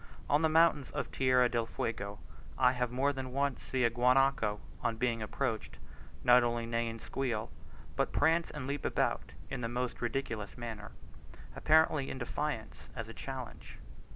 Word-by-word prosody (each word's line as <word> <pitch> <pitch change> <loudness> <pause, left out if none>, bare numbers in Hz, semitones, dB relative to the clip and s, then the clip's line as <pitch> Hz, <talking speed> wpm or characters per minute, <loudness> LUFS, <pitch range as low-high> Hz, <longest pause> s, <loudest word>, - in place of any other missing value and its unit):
On 145 +2 +3
the 160 - +3
mountains 155 -4 +4
of - - -3
Tierra 130 -1 +4
del 115 -1 -1
Fuego, 100 -3 -3 0.4
I 125 -1 +5
have 125 -1 -1
more 135 +3 +1
than 130 -2 -5
once 140 0 0
seen 130 -2 0
a 115 - +3
guanaco, 125 -3 +3 0.2
on 115 -1 0
being 115 -1 0
approached, 110 +1 -3 0.5
not 125 0 +7
only 120 -1 0
neigh 115 0 -1
and 115 0 -5
squeal, 115 -1 -3 0.4
but - - 0
prance 165 +3 +3
and 145 -4 -6
leap 140 +1 -3
about - - 0 0.2
in 135 -2 -3
the 115 - -2
most 125 +1 -3
ridiculous 115 -3 -3
manner, 110 -3 -6 0.6
apparently 155 -3 +3
in - - -5
defiance 130 -1 -4
as 115 -3 -5
a - - -8
challenge. 130 -1 -7
125 Hz, 165 wpm, -32 LUFS, 115-135 Hz, 0.6 s, not